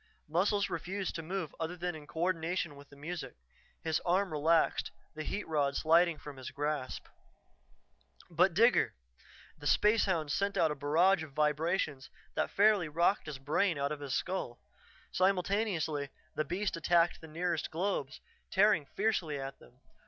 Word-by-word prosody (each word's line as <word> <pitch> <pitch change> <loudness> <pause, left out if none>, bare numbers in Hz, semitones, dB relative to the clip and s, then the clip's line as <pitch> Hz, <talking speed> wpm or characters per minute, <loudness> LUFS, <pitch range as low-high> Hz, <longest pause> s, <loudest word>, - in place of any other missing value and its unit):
Muscles 200 +5 +1
refused 185 +2 -3
to 165 - -4
move 175 -1 -4
other 165 +2 -3
than 180 0 -2
in 150 -2 -10
coordination 165 0 -1
with 140 0 -14
the - - -15
music. 160 +4 -6 0.5
His 160 -1 +1
arm 185 +1 +1
relaxed, 160 +2 +2 0.2
the 155 - -6
heat 200 +6 -4
rod 145 -3 +1
sliding 165 +2 +4
from 145 -2 -10
his 130 - -6
grasp. 145 -2 -3 1.2
But 175 +1 +2
Digger! 235 +5 +4 0.6
The 145 - -4
spacehound 190 -8 +3
sent 200 +3 0
out 160 -2 +3
a - - -2
barrage 160 +6 +3
of 155 -3 -8
vibrations 150 -1 0 0.2
that - - 0
fairly 200 -5 +3
rocked 170 +4 +1
his 150 -3 -5
brain 155 +6 +1
out 140 +1 -1
of 150 - -4
his 140 -2 -3
skull. 180 -10 -3 0.5
Simultaneously, 180 -6 +1 0.2
the 155 - -1
beast 190 +3 -2
attacked 170 +1 +2
the 160 - -10
nearest 165 +1 -2
globes, 160 -6 -2 0.3
tearing 190 -7 +3
fiercely 185 -9 -1
at 135 0 -6
them. 125 +2 -20
165 Hz, 150 wpm, -32 LUFS, 150-185 Hz, 1.2 s, sliding